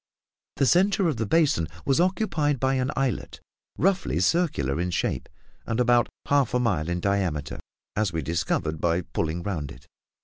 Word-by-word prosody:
The 140 - +2
centre 190 +5 +3
of 150 -7 -1
the 110 -1 -2
basin 145 - +2 0.2
was 135 +2 +2
occupied 170 - +1
by 130 +1 +1
an 130 0 0
islet, 135 -8 -2 0.4
roughly 190 +3 +1
circular 85 - +1
in 90 - -1
shape, 90 - -2 0.4
and 115 +1 -1
about 120 -1 +3 0.2
half 140 -4 +2
a - - +3
mile 90 -10 0
in 90 0 -1
diameter, 90 -7 -1 0.4
as 105 -3 +1
we 80 -2 -2
discovered 80 0 -1
by 85 +1 +1
pulling 85 0 -3
round 80 -8 -3
it. - - -14
115 Hz, 165 wpm, -25 LUFS, -, 0.4 s, centre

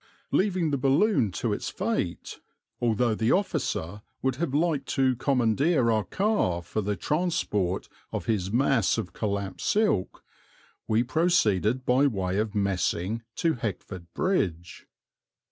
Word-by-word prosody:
Leaving 185 -5 +1
the 140 - 0
balloon 135 - +3
to - - -2
its - - -3
fate - - -3 0.4
although 120 0 +2
the 110 +2 +1
officer 130 - -1 0.2
would 130 -1 0
have 170 -1 -1
liked 150 -2 0
to 130 -1 +2
commandeer 125 +1 +2
our 110 -1 +1
car 190 - 0
for 110 - -3
the 105 0 -1
transport 105 - -1 0.2
of - - -4
his 100 -4 -1
mass 120 -5 +2
of 105 -5 -4
collapsed 100 -4 -3
silk 205 - +1 0.6
we 110 +2 +2
proceeded 125 - +2
by 130 +3 +4
way 95 -5 -1
of 110 -1 -2
Messing 100 +2 0
to 165 -1 +1
Heckford 95 - -5
Bridge. 90 - -1
115 Hz, 130 wpm, -27 LUFS, 100-145 Hz, 0.6 s, by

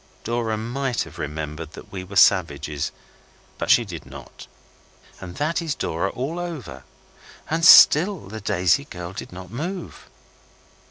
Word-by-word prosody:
Dora 115 -1 -1
might 125 +3 -2
have 80 - -13
remembered 75 +1 -5
that - - -12
we 95 -2 -6
were 95 +2 -11
savages, 75 -7 +2 0.7
but - - -3
she 120 - +5
did 90 -5 -8
not. 65 -1 -12 0.7
And 90 -1 -9
that 155 +4 -1
is 160 -3 -3
Dora 85 +4 -2
all 140 +11 -4
over. 155 - -7 0.7
And 165 +1 0
still 180 +2 +8
the 110 +2 -8
Daisy 95 +9 +1
girl 90 -6 -8
did 100 - -8
not 90 0 -10
move. 170 - -6
100 Hz, 145 wpm, -23 LUFS, 85-140 Hz, 0.7 s, still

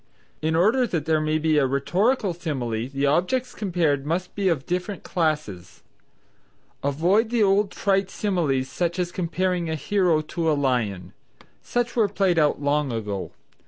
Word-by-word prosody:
In 160 +1 0
order 225 +9 +3
that 165 -7 -2
there 160 -1 +2
may 155 0 +1
be 155 -1 +2
a 135 - +2
rhetorical 185 - +1
simile, 125 -9 -3
the 140 +1 -1
objects 180 - +1
compared 170 -8 0
must 170 +5 -2
be 195 -2 +1
of 150 -6 -1
different 180 +2 -3
classes. 150 - -2 1.0
Avoid 175 - +2
the 235 -2 +2
old 200 +1 +3
trite 195 -1 0
similes 160 -12 0
such 170 +6 -2
as 175 -1 -1
comparing 180 -1 -1
a 160 - -1
hero 175 0 +1
to 160 +1 -1
a 150 - +1
lion. 120 -9 -1 0.5
Such 240 0 -2
were 220 -4 +3
played 190 -4 +1
out 150 -1 +2
long 145 -1 0
ago. 105 -4 -4
165 Hz, 160 wpm, -24 LUFS, 140-190 Hz, 1.0 s, order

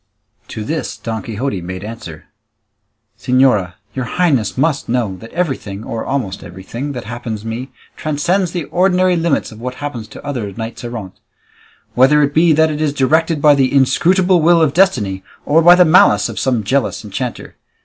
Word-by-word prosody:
To 110 - -6
this 155 +8 -4
Don 110 -2 -4
Quixote 110 -1 -4
made 90 +2 -7
answer, 105 -8 -9 0.9
"Señora, 125 -8 +2 0.2
your 130 -2 -3
highness 135 - 0
must 140 -1 0
know 115 -6 -1
that 115 +4 -12
everything 130 - -3
or 115 0 -5
almost 125 -9 -3
everything 100 +10 -7
that 125 -3 -6
happens 115 -1 -6
me 120 +4 -5 0.3
transcends 170 +5 -1
the 175 -2 -3
ordinary 185 +2 +2
limits 165 -6 0
of 110 - -12
what 125 +1 -5
happens 125 -7 -6
to 110 - -12
other 120 -8 -4
knights 115 +3 -7
errant; 115 -6 -7 0.7
whether 145 +4 +4
it 145 0 0
be 165 +2 +4
that 160 +1 +3
it 150 0 -4
is 150 -2 0
directed 155 +3 +1
by 150 -1 +7
the 135 -2 +2
inscrutable 175 +7 +3
will 170 +2 +5
of 155 -4 +2
destiny, 120 - +2 0.2
or 160 +3 +4
by 175 +2 +8
the 180 0 +5
malice 165 +3 +4
of - - -5
some 125 -5 0
jealous 130 +3 -1
enchanter. 115 +5 -5
130 Hz, 170 wpm, -17 LUFS, 110-160 Hz, 0.9 s, by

